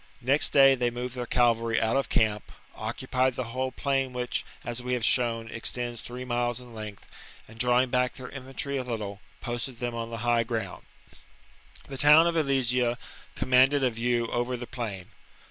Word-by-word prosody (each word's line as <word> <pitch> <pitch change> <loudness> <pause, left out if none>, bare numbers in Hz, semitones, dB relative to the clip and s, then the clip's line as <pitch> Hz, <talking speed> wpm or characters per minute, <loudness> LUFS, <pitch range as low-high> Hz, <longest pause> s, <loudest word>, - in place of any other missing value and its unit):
Next 140 +4 +4
day 135 -1 +7
they 125 -2 0
moved 125 +1 -5
their 125 -1 -5
cavalry 115 -2 +2
out 110 +2 +1
of 135 - 0
camp, 105 -2 0 0.2
occupied 130 0 -1
the 130 - -2
whole 130 0 -1
plain 135 -2 -1
which, 125 0 -2 0.2
as 120 +1 -4
we 125 +1 -3
have 120 -3 0
shown, 115 -2 +2
extends 120 +1 -1
three 125 +1 -7
miles 120 0 -1
in 125 -2 -11
length, 105 -2 -8 0.4
and, 115 +1 -15
drawing 125 +1 +3
back 125 0 +1
their 130 -3 -8
infantry 135 +1 -4
a 130 - -2
little, 105 -5 -5 0.2
posted 120 +1 -4
them 120 0 -3
on 115 0 -4
the 115 - -5
high 120 -1 +3
ground. 110 -5 -4 1.0
The 135 - -6
town 150 +3 +7
of 170 - +1
Alesia 125 -5 +1 0.4
commanded 135 +2 +4
a 130 - +3
view 120 +1 0
over 120 +1 -1
the 120 - -6
plain. 110 -8 -6
125 Hz, 180 wpm, -27 LUFS, 115-130 Hz, 1.0 s, day